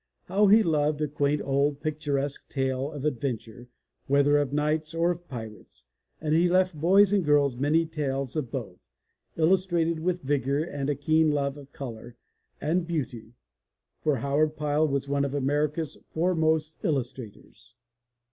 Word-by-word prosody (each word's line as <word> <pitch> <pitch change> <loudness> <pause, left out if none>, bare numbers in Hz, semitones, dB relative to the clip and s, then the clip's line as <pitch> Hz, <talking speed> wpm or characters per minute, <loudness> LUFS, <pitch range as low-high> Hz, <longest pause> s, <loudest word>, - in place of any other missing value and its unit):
How 200 +3 +2
he 215 +3 +6
loved 150 -3 +1
a 150 - +1
quaint 145 0 0
old 140 +1 +1
picturesque 145 -2 -3
tale 135 +1 -1
of 145 -2 -6
adventure, 120 -3 -3 0.4
whether 140 +1 +4
of 145 -2 -1
knights 155 +2 -1
or 170 +1 +2
of 175 0 -7
pirates, 110 - -10 0.3
and 155 -1 -1
he 170 +2 +4
left 185 0 +3
boys 190 +6 +4
and 200 -3 +3
girls 145 -3 +3
many 150 +6 +2
tales 140 -4 -3
of 150 -6 -2
both, 105 - -7 0.5
illustrated 170 -1 +2
with 175 +1 -1
vigor 140 +1 0
and 145 -4 -4
a 145 - +1
keen 155 +3 +2
love 140 -2 0
of 140 -1 -13
color 120 -4 -8 0.4
and 165 +2 0
beauty, 125 -8 -4 0.6
for 150 -2 +1
Howard 145 +5 0
Pyle 150 +1 +1
was 140 -1 -2
one 140 0 0
of 140 0 -2
America's 145 +3 -1
foremost 160 -2 0
illustrators. 125 - -5
145 Hz, 150 wpm, -27 LUFS, 135-160 Hz, 0.6 s, he